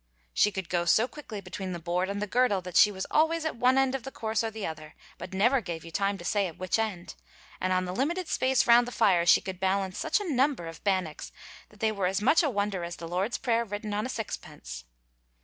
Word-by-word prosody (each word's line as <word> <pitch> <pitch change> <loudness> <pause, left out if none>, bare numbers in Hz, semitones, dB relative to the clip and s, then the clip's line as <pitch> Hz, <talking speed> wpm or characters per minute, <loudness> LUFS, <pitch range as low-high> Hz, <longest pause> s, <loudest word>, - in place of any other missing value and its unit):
She 210 - +3
could 190 -3 -5
go 175 -1 0
so 220 +7 +4
quickly 245 -8 -8
between 190 0 -6
the 175 - -5
board 175 +3 -1
and 200 0 -3
the 210 - -1
girdle 240 -2 +2
that 180 -1 -8
she 210 - +7
was 190 -1 -4
always 320 +1 +2
at 315 - -1
one 255 +2 +3
end 270 -1 +3
of 270 - -2
the 270 - -7
course 220 -2 -1
or 225 - -1
the 220 -2 -6
other, 155 -1 -7 0.2
but - - -7
never 240 +7 +3
gave 170 -5 -6
you 165 - -9
time 200 +2 0
to 175 - -10
say 200 0 +1
at 165 - -10
which 185 +4 -1
end, 200 -6 -3 0.5
and 185 - -1
on 185 0 +1
the 180 - -4
limited 330 - -1
space 265 -3 +2
round 235 +1 +6
the - - -5
fire 185 -8 +3
she - - +7
could 190 -2 -6
balance 190 -1 0
such - - +1
a 410 - -5
number 270 - +1
of 165 0 -9
bannocks 185 -6 -1 0.4
that 210 - -20
they 220 -1 +2
were 200 -3 -1
as 190 +2 0
much 300 +10 +4
a 310 - +1
wonder 200 -5 -1
as 170 0 -5
the 165 - -8
Lord's 185 +7 -1
prayer 235 -1 +1
written 210 -1 -5
on 210 +4 -1
a - - -9
sixpence. 60 - -6
200 Hz, 255 wpm, -28 LUFS, 180-240 Hz, 0.5 s, she